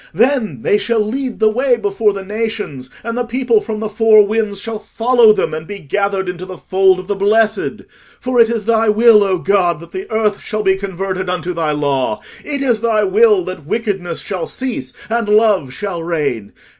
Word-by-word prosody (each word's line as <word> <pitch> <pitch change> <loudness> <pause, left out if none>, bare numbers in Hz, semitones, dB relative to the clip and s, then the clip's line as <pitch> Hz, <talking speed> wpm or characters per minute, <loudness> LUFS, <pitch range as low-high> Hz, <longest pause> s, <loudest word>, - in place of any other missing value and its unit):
Then 235 0 +1
they 205 - +2
shall 225 +3 0
lead 245 +4 -2
the 220 - +4
way 245 +3 +2
before 205 0 0
the 195 -1 -6
nations, 210 - -4
and 230 +1 -4
the 245 - -1
people 240 -2 +1
from 220 -2 -5
the 220 - -2
four 215 0 +5
winds 210 -1 -1
shall 220 +1 -5
follow 235 0 +3
them, 210 - 0
and 155 0 -5
be 205 - -6
gathered 195 +3 -2
into 180 0 -5
the 185 -1 -8
fold 190 0 +2
of 185 0 -8
the 205 - 0
blessed. 215 +2 +1 0.4
For 250 -1 -1
it 230 -1 +6
is 225 -3 -2
thy 225 -1 +2
will, 215 0 +6
O 190 -2 +1
God, 175 -3 +1
that 170 +1 -13
the 190 +2 -7
earth 215 -2 0
shall 215 -1 -3
be 190 -1 +3
converted 190 -1 -4
unto 180 0 -2
thy 165 -3 -1
law: 140 -6 -1 0.2
it 285 -2 -3
is 240 -5 +1
thy 225 -2 +2
will 420 -1 +4
that 160 -6 -7
wickedness 195 -6 -2
shall 185 -4 -4
cease 240 - -4 0.2
and 230 -1 -1
love 210 - +3
shall 185 +2 -5
reign. 145 -11 -3
210 Hz, 200 wpm, -16 LUFS, 185-225 Hz, 0.4 s, it